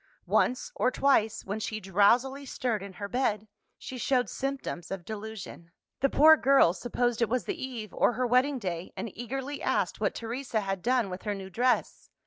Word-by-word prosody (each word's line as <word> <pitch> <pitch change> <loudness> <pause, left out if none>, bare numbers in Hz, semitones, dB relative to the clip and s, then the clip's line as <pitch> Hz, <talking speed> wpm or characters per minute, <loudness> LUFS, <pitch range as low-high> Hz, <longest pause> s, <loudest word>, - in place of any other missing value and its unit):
Once 250 - +1
or - - +2
twice, 255 -5 +2
when 205 +2 -3
she 215 0 -3
drowsily 230 +9 +2
stirred 245 -5 -2
in 200 -1 -8
her 200 +2 -6
bed, 215 -3 -1 0.3
she 255 - -8
showed 245 -3 +1
symptoms 270 -11 -4
of 195 -3 -5
delusion. 215 -5 -7 0.3
The 275 - +2
poor 315 +4 +7
girl 270 - +5
supposed 240 +2 -1
it 235 - +2
was 250 +1 0
the 365 -8 -4
eve 235 -5 -6
or - - +3
her 250 +2 0
wedding 255 +3 +3
day, 180 -6 -4
and 225 - -5
eagerly 270 +4 -5
asked - - 0
what - - 0
Teresa 230 0 -3
had 195 -2 -3
done 240 -3 +1
with 180 - -6
her 210 -1 -2
new 190 -1 -8
dress. 245 +5 0
235 Hz, 185 wpm, -29 LUFS, 200-260 Hz, 0.3 s, poor